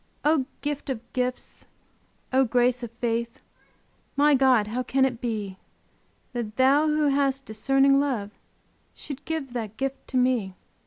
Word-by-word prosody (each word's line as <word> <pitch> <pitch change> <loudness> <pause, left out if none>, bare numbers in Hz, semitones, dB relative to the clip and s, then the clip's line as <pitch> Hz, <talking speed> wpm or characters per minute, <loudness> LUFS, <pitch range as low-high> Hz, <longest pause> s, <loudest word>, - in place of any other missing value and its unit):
O 300 -4 +3
gifts 290 0 -4
of 245 -2 -6
gifts! 250 0 -3 0.7
O 265 +1 +5
grace 245 0 +2
of 235 - -5
faith 235 0 -2 0.8
My 290 +1 +4
God! 260 -5 +4
how 230 +4 -3
can 265 +1 +2
it 245 -3 -3
be 210 -5 -4 0.7
That 230 -3 -4
Thou 275 +5 +4
who 300 -1 +2
hast 275 -1 +1
discerning 270 +5 +3
love, 245 -8 -1 0.6
Shouldst 280 -2 -8
give 310 -6 -4
that 220 -3 -5
gift 270 +1 -4
to 260 - -2
me? 245 -7 +1
255 Hz, 145 wpm, -25 LUFS, 235-275 Hz, 0.8 s, O